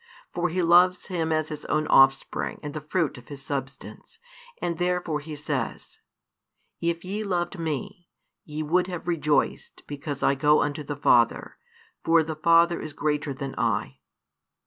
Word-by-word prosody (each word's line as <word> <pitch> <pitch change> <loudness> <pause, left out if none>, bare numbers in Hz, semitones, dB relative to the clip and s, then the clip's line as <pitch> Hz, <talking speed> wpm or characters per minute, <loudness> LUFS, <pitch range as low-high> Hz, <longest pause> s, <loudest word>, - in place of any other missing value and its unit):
For 175 0 0
He 180 +2 -1
loves 180 +2 +4
Him 165 -3 -1
as 155 -1 0
His 150 -1 -6
own 155 0 0
Offspring 135 -1 +3
and 145 -1 -5
the 155 - -5
fruit 150 -3 -1
of 120 - -18
His 140 -2 -9
Substance, 135 -1 -6 0.4
and 170 -1 -3
therefore 175 -3 0
He 150 +1 -8
says, 145 -4 -4 0.8
If 170 +1 -2
ye 205 +4 -3
loved 180 -2 -2
Me, 175 +4 -4 0.3
ye 155 0 -5
would 180 +4 +1
have 175 -2 -6
rejoiced 150 -4 0
because 145 -1 -6
I - - +4
go 150 +2 +3
unto 145 +1 -3
the 145 0 -5
Father: 120 -4 +2 0.5
for 165 0 +4
the 160 0 -5
Father 170 +2 +4
is 155 - -7
greater 150 -1 -1
than 135 0 -5
I. 65 0 -1
155 Hz, 160 wpm, -26 LUFS, 145-175 Hz, 0.8 s, loves